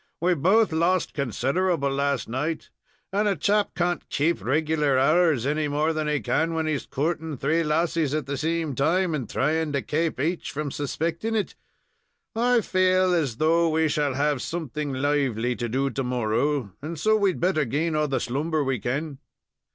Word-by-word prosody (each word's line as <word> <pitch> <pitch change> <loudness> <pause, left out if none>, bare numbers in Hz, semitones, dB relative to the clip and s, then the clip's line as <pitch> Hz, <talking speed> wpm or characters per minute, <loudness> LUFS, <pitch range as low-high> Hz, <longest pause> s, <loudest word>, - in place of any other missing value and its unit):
"We 180 +2 +2
both 190 +8 +3
lost 170 +2 +1
considerable 140 - 0
last 140 -2 0
night, 150 +7 -3 0.4
and 210 +2 +2
a 200 - +2
chap 205 +1 +1
can't 175 -1 -1
kaap 150 - 0
reg'lar 150 +2 +1
hours 155 -2 +3
any 150 +1 0
more 150 +3 0
than 155 -1 -2
he 150 -1 +1
can 165 +1 0
when 160 -1 0
he's 155 -3 -2
coorting 155 +1 -2
three 155 +6 +1
lassies 155 -1 0
at 155 -3 -2
the 140 +1 -3
same 160 +1 -1
time, 165 +7 +1
and 135 -7 -3
thrying 155 +2 0
to 140 - -1
kaap 160 +2 -1
aich 165 +6 -1
from 145 -1 -4
suspecting 165 +10 -2
it. 210 - -1 0.8
I 240 +1 +3
faal 185 -1 +2
as 145 -10 0
though 165 +3 +3
we 160 0 +2
shall 145 -3 0
have 145 -1 +1
something 150 -3 -4
lively 130 -4 0
to 120 +2 -3
do 135 +3 0
to 135 +3 -2
morrow, 125 0 0
and 160 +2 -6
so 215 +5 +3
we'd 200 -4 +1
better 175 -3 +2
gain 155 +6 -1
all 150 0 +1
the 135 -2 0
slumber 150 +5 -1
we 135 -3 -1
kin." 140 +6 -3
155 Hz, 175 wpm, -25 LUFS, 140-170 Hz, 0.8 s, both